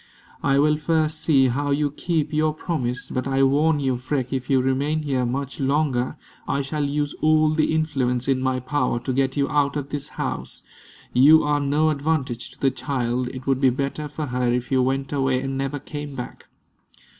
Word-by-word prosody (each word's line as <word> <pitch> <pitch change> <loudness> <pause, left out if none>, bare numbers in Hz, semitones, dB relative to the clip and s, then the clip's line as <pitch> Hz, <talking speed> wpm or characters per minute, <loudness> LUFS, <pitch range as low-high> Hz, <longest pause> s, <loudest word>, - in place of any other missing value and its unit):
"I 140 -1 +2
will 150 +1 +3
first 155 0 0
see 135 -5 +4
how 145 +4 -1
you 145 0 +1
keep 160 +1 -2
your 155 0 +1
promise. 130 -7 -3
But 130 0 -2
I 135 0 +2
warn 145 +3 +3
you, 130 -3 0
Freke, 130 0 -3
if 130 -1 -3
you 135 -2 +4
remain 140 +4 0
here 130 -4 0
much 135 +2 -3
longer, 140 -1 0 0.3
I 140 0 0
shall 150 +2 -2
use 145 0 -1
all 155 0 +4
the 155 0 +1
influence 135 -6 0
in 135 -1 +1
my 130 -1 0
power 130 -2 -1
to 130 +2 -3
get 135 +1 0
you 140 -1 +2
out 145 0 +1
of 140 -1 -4
this 145 -2 -4
house. - - -4 0.5
You 150 +5 +7
are 150 0 +1
no 145 +2 +2
advantage 140 -5 -2
to - - -17
the 135 - +2
child. 125 -1 -2
It 130 +1 -8
would 135 -1 +1
be 135 - +5
better 140 +4 -3
for 150 +1 -5
her 125 -2 0
if 125 +1 -2
you 130 -1 +3
went 135 +2 -1
away 135 -2 +1
and 135 +1 -3
never 135 +1 -2
came 145 0 -7
back." 125 - -8
140 Hz, 200 wpm, -23 LUFS, 130-150 Hz, 0.5 s, You